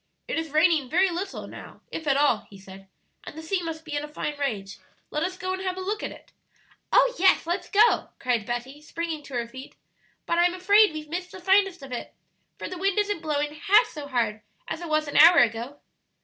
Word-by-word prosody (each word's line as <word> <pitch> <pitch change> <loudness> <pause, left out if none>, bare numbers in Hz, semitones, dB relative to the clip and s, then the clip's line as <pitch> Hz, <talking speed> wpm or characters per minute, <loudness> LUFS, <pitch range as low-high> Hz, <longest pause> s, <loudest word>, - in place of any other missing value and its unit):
"It - - -1
is 325 -1 -5
raining 310 -3 +3
very 365 +4 +3
little 380 +3 -5
now, - - -12
if 320 - -6
at 275 -1 +3
all," 280 -7 +2
he 200 - -13
said, 195 0 -13 0.4
"and - - -10
the 320 - -7
sea 360 +3 -1
must 325 -1 -6
be 310 - -7
in 290 - -2
a - - -6
fine 300 0 -4
rage; 205 -9 -3 0.3
let 300 - -2
us 365 +2 -2
go 370 0 -3
and 375 - -4
have 370 -1 -3
a - - -4
look 415 +3 -3
at - - -4
it" - - -15 0.6
"Oh, - - +5
yes, 380 -2 +4
let's 345 +3 -3
go!" 415 +1 +4
cried 240 -4 -1
Betty, 250 +4 -5
springing 325 0 -5
to 280 -2 -10
her 235 -1 -2
feet; 260 +3 -11 0.5
"but 340 - 0
I'm 350 +1 +3
afraid 405 +2 +5
we've 305 -1 -7
missed 360 +3 -5
the 380 - -9
finest 385 -3 +2
of 270 - -10
it, 245 - -6 0.4
for - - -6
the 370 - -7
wind 390 +1 0
isn't 410 -4 0
blowing 295 -2 -1
half 415 +8 +4
so 295 -8 -8
hard 230 -5 -1 0.3
as - - -5
it 340 - -6
was 310 0 +1
an 290 - -2
hour 335 +3 +9
ago." 235 +4 +2
315 Hz, 230 wpm, -25 LUFS, 275-370 Hz, 0.6 s, hour